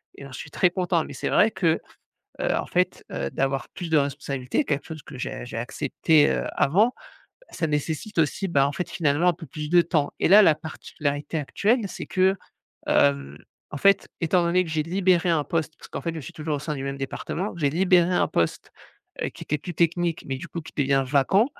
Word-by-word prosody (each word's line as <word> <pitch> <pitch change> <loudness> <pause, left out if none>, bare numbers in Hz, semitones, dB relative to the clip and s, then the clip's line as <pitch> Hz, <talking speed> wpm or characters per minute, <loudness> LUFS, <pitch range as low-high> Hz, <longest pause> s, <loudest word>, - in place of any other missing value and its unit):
et - - -13
alors 140 -1 -10
je - - -7
suis 150 - -9
très 180 - +3
content. 175 -2 0
Mais - - -9
c'est - - -3
vrai 220 - +5
que, 165 -6 +1 0.6
heu, - - +1
en - - -1
fait, 180 0 -1
heu, - - -3
d'avoir 135 -1 -1
plus 175 -3 -7
de 160 - +5
responsabilités 140 - -2
quelque 145 - -1
chose 160 -3 -8
que 145 - -11
j'ai 125 - -5
j'ai 120 - -7
accepté, 145 +5 +2
heu, - - -1
avant, 210 - +3 0.6
ça 160 - -2
nécessite 155 +7 -3
aussi, 165 +5 +1
bah, 140 -5 +3
en - - -2
fait 160 +5 -4
finalement 165 -1 +1
un - - +2
peu 165 0 -10
plus 150 +2 -6
de 175 +1 +6
temps 160 -4 0
et - - +3
là 205 +4 +9
la 160 -7 +5
particularité 150 -1 -4
actuelle 210 - +1
c'est - - -7
que, 190 +1 +3 0.5
hem, 70 0 +2 0.3
en 150 - -5
fait 200 +5 +4
étant 175 +2 +2
donné 175 +2 +3
que 175 - -7
j'ai 155 -1 0
libéré 180 +1 +2
un 160 -3 +2
poste- 160 0 -2
parce - - -13
qu'en - - -6
fait 165 -1 -3
je 160 - -5
suis - - -10
toujours 155 -1 -2
au - - -4
sein 150 +2 -4
du 135 - -5
même 135 0 -4
département- 165 +8 -4
j'ai 145 -4 +1
libéré 180 +1 +3
un 180 - +2
poste, 85 - -1 0.5
heu, - - -1
qui - - -11
était 150 - 0
plus 175 +5 -7
technique, 170 0 0
mais 135 - -2
du 155 +6 -8
coup 170 - -5
qui 160 - -12
devient 135 -1 +2
vacant 145 - +3
160 Hz, 225 wpm, -25 LUFS, 140-180 Hz, 0.6 s, là